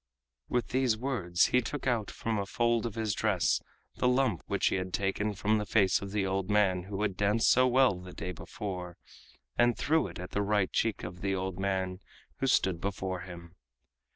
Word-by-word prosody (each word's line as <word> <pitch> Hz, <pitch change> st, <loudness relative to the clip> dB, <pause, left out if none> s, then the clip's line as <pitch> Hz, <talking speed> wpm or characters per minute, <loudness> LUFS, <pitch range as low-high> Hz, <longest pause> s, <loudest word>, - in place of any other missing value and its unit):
With 125 Hz, -4 st, 0 dB
these 130 Hz, -3 st, +2 dB
words 110 Hz, -9 st, +1 dB
he 125 Hz, -, +5 dB
took 145 Hz, +4 st, -5 dB
out 120 Hz, -5 st, 0 dB
from 110 Hz, -2 st, -2 dB
a 100 Hz, -, -3 dB
fold 120 Hz, +1 st, +1 dB
of 110 Hz, -, -7 dB
his 110 Hz, -2 st, -1 dB
dress 100 Hz, -5 st, +1 dB, 0.4 s
the -, -, +2 dB
lump 125 Hz, -, +2 dB
which -, -, +1 dB
he -, -, 0 dB
had 95 Hz, -1 st, -4 dB
taken 100 Hz, +1 st, -1 dB
from 105 Hz, +3 st, +1 dB
the 105 Hz, -, -3 dB
face 100 Hz, -3 st, +3 dB
of 100 Hz, -, -5 dB
the 100 Hz, -1 st, 0 dB
old 95 Hz, 0 st, -1 dB
man 95 Hz, -4 st, +2 dB
who 100 Hz, +1 st, -3 dB
had 100 Hz, -3 st, -1 dB
danced 105 Hz, +3 st, +3 dB
so 130 Hz, +1 st, +5 dB
well 125 Hz, -6 st, +4 dB
the 90 Hz, 0 st, -10 dB
day 90 Hz, -, -5 dB
before, 90 Hz, 0 st, -6 dB, 0.6 s
and 120 Hz, -1 st, +4 dB
threw 160 Hz, +1 st, +2 dB
it -, -, -9 dB
at 90 Hz, +1 st, -7 dB
the 105 Hz, -, 0 dB
right 100 Hz, -1 st, +1 dB
cheek 115 Hz, -2 st, 0 dB
of 90 Hz, +1 st, -7 dB
the 95 Hz, 0 st, 0 dB
old 95 Hz, -1 st, -3 dB
man 95 Hz, -1 st, -1 dB, 0.4 s
who 135 Hz, -, 0 dB
stood 95 Hz, -9 st, +2 dB
before 95 Hz, -1 st, -3 dB
him. 85 Hz, -2 st, -10 dB
100 Hz, 205 wpm, -30 LUFS, 95-115 Hz, 0.6 s, he